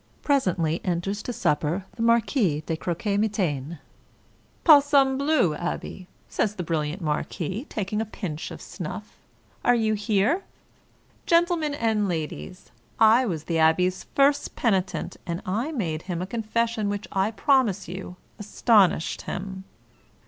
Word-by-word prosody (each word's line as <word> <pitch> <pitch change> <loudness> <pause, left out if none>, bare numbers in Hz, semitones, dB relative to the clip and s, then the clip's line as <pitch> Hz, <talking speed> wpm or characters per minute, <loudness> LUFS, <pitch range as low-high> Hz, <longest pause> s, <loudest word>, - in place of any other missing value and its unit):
Presently 180 - +1
enters 190 +3 -2
to 245 - -4
supper 165 -2 0
the 230 - -6
Marquis 230 - +2
de 165 - -1
Croquemitaine. 175 -4 -1 0.5
" - - -35
Palsambleu, 280 - +5
abbe! 175 +2 -5
" - - -36
says 210 -1 -1
the 180 - -4
brilliant 160 +2 -2
marquis, 175 - -3
taking 210 +1 -2
a - - -2
pinch 175 -7 -5
of - - -9
snuff, - - -7 0.5
"are 245 - +4
you 220 -2 +1
here? 210 - +1 0.9
Gentlemen 335 -3 +2
and 220 -5 +1
ladies! 170 +2 -5 0.3
I 225 +3 +6
was 160 -6 -3
the 165 0 -1
abbe's 180 +4 +2
first 280 +1 +3
peni 195 -6 +2
tent, 190 - -6
and 170 0 -2
I 225 +11 -1
made 170 - -2
him 175 -1 -4
a 180 - -2
confession, 225 0 -1
which 205 0 -4
I 195 +2 +1
promise 225 - +2
you 180 +1 -7 0.2
astonished 205 -4 +2
him." 190 0 -5
200 Hz, 135 wpm, -25 LUFS, 175-235 Hz, 0.9 s, I